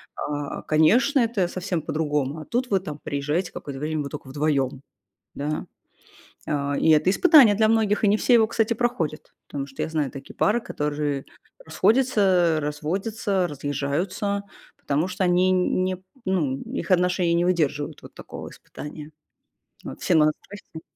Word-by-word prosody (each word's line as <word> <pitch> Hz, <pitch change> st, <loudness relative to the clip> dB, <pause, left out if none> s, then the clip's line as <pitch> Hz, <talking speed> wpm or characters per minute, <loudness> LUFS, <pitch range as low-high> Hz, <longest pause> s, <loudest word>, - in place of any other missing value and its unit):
а, 145 Hz, -1 st, -4 dB
конечно, 220 Hz, -, +3 dB
это 225 Hz, -7 st, +1 dB
совсем 180 Hz, -2 st, -3 dB
по-другому. 150 Hz, -1 st, -2 dB
А 155 Hz, -, -8 dB
тут 245 Hz, -, -2 dB
вы 195 Hz, -, +2 dB
там 150 Hz, -5 st, -7 dB
приезжаете 145 Hz, +6 st, -2 dB
какое-то 140 Hz, -1 st, -7 dB
время, 155 Hz, 0 st, -2 dB
вы 140 Hz, -, -6 dB
тока 145 Hz, -2 st, -8 dB
вдвоём, 140 Hz, -2 st, 0 dB, 0.5 s
да. 150 Hz, +2 st, -3 dB, 0.8 s
А, 145 Hz, -1 st, -1 dB
и 160 Hz, -, +3 dB
это 155 Hz, +3 st, +4 dB
испытание 265 Hz, -, +7 dB
для 220 Hz, +1 st, +3 dB
многих, 220 Hz, -2 st, +2 dB
и 210 Hz, -, +4 dB
не 205 Hz, -, +4 dB
все 245 Hz, -, +3 dB
его, 220 Hz, -2 st, +5 dB
кстати, 225 Hz, 0 st, +1 dB
проходят, 220 Hz, -11 st, -2 dB
потому 140 Hz, -1 st, -5 dB
что 135 Hz, -, -6 dB
я -, -, -1 dB
знаю 155 Hz, -4 st, -1 dB
такие 135 Hz, -1 st, -10 dB
пары, 220 Hz, +4 st, +2 dB
которые 150 Hz, -, -3 dB, 0.4 s
расходятся, 195 Hz, -, +3 dB
разводятся, 185 Hz, +6 st, -1 dB
разъезжаются, 150 Hz, +8 st, -2 dB, 0.3 s
потому 145 Hz, +4 st, -1 dB
что 185 Hz, +1 st, -3 dB
они 180 Hz, +1 st, +3 dB
не, 185 Hz, 0 st, +1 dB, 0.3 s
ну, 155 Hz, -8 st, 0 dB
их 170 Hz, -, -5 dB
отношения 180 Hz, -1 st, +2 dB
не 170 Hz, +1 st, +2 dB
выдерживают 150 Hz, -5 st, -1 dB
вот -, -, -12 dB
такого -, -, -9 dB
испытания. 150 Hz, +1 st, -10 dB, 0.7 s
Вот, -, -, -8 dB
всем 170 Hz, -, +3 dB
мало 155 Hz, 0 st, +4 dB
страсти. 190 Hz, -5 st, -11 dB
170 Hz, 155 wpm, -24 LUFS, 150-200 Hz, 0.8 s, испытание